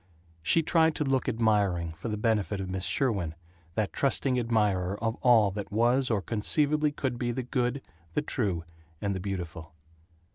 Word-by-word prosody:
She 165 - +3
tried 160 -1 +3
to - - 0
look 135 -2 +1
admiring, 100 -8 +1
for 85 +7 -7
the 105 -1 -2
benefit 105 -2 0
of 95 - -3
Miss 95 0 -1
Sherwin, 100 - 0 0.4
that 110 -2 -1
trusting 135 -1 +1
admirer 105 -5 +1
of 115 0 0
all 115 -5 +5
that 100 +1 -6
was 120 +5 +2
or 105 -4 0
conceivably 150 +7 +1
could 130 -4 -3
be 120 -1 0
the 125 +2 -3
good, 125 +1 -1 0.3
the - - +1
true, 100 - -1 0.4
and 100 -1 -1
the 95 - -3
beautiful. 85 -4 -6
110 Hz, 170 wpm, -28 LUFS, 95-130 Hz, 0.4 s, all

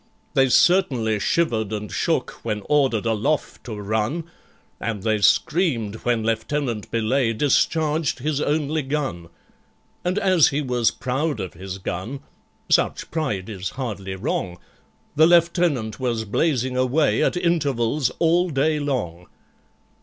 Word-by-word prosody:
They 135 -1 +4
certainly 125 - +3
shivered 110 -6 0
and 105 -1 -4
shook - - -1
when 105 -3 -3
ordered 135 -7 +2
aloft 115 +7 -1
to 115 -4 -5
run, 110 +10 -1 0.6
And 105 -4 -3
they 110 -1 +1
screamed 115 - +2
when 120 -1 0
LIEUTENANT 115 0 -2
BELAYE 115 +1 +1
discharged 150 +4 +1
his 145 +2 -2
only 155 +1 0
gun. 135 - -3 0.7
And 180 +2 -1
as 185 -6 +4
he 140 - -1
was 125 -5 +1
proud 135 +1 -2
of 95 -3 -5
his 95 +2 -7
gun—such 95 +9 -3
pride 110 - -2
is 95 -4 -4
hardly 100 -7 -4
wrong— 90 -1 -3 0.6
The 155 +2 +6
Lieutenant 170 - +2
was 120 -4 -1
blazing 130 +2 0
away 130 +4 +2
at - - +1
intervals 145 -7 +1
all 175 +2 +2
day 150 +1 +1
long. 105 - -3
130 Hz, 125 wpm, -23 LUFS, 110-155 Hz, 0.7 s, The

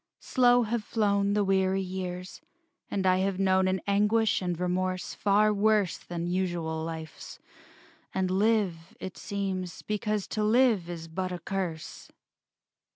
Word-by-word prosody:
Slow 245 -1 +4
have 225 0 -2
flown 200 -2 +1
The 210 0 +2
weary 190 0 +2
years: 180 -1 -6 0.5
and 195 -2 -1
I 185 0 +4
have 195 0 0
known 190 -1 +3
An 185 0 +1
anguish 210 +2 +2
and 175 -2 -2
remorse 185 0 -1
far 210 +1 +3
worse 210 -3 +2
Than 170 -1 -5
usual 175 -3 -2
life's; 160 -2 -7 0.7
and 190 -1 -1
live, 195 -4 0
it 185 - -6
seems, 190 -3 -4
Because 210 -1 -1
to 215 - -1
live 220 -5 +3
is 165 -2 -6
but 185 +3 -3
a 180 - -3
curse.... 175 -3 -5
190 Hz, 140 wpm, -28 LUFS, 180-210 Hz, 0.7 s, Slow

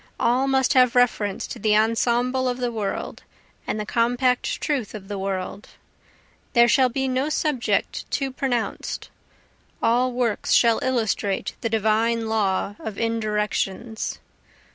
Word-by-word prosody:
All 255 +3 +2
must 265 0 +2
have 255 -3 +4
reference 220 -5 +2
to - - -7
the 210 0 +3
ensemble 240 +3 +1
of 250 - -2
the 245 -1 -1
world, 215 -4 -4 0.5
and 215 - -2
the 210 - -3
compact 245 +3 +1
truth 260 -8 -2
of 195 -1 -9
the 200 -1 -4
world, 195 +1 -4 0.9
There 235 -2 +6
shall 260 +1 +4
be 265 +2 -1
no 260 +3 0
subject 300 -5 -1
too 275 -1 -1
pronounced 250 -3 -3 0.7
all 245 +2 +2
works 240 -3 0
shall 230 -2 +5
illustrate 220 -6 -1
the 230 - -1
divine 225 +1 +1
law 205 -2 0
of 215 -2 -6
indirections. 220 -1 -2
230 Hz, 135 wpm, -23 LUFS, 215-255 Hz, 0.9 s, There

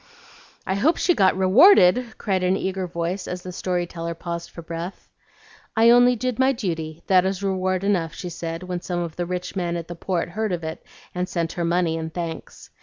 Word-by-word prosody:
"I 190 - 0
hope 275 - +2
she 355 - +3
got 190 - +3
rewarded," 225 - +5
cried 190 -3 -1
an 185 +1 +2
eager 190 -1 -2
voice, 170 +2 -3
as 180 0 -5
the 185 - -6
story 180 -1 -1
teller 170 -1 -5
paused 170 0 -5
for 170 - -10
breath. 170 +3 -6 0.7
"'I 230 +1 +7
only 245 +1 +6
did 250 +1 -3
my 265 +1 +4
duty; 165 -8 -4
that 185 -2 +4
is 190 +1 -2
reward 185 -1 0
enough,' 175 -5 0
she 180 - -6
said, 165 0 -5
when 180 -1 -4
some 175 -1 -3
of 170 -2 -5
the 175 -1 -3
rich 180 +1 -4
men 175 -2 -1
at 170 -1 -6
the 175 - -6
Port 175 0 -2
heard 215 +2 -2
of 170 -2 -3
it 160 0 -6 0.3
and 180 0 -2
sent 165 -2 -1
her 170 - -2
money 170 -1 +1
and 160 0 -5
thanks. 165 -1 -7
180 Hz, 210 wpm, -23 LUFS, 170-195 Hz, 0.7 s, I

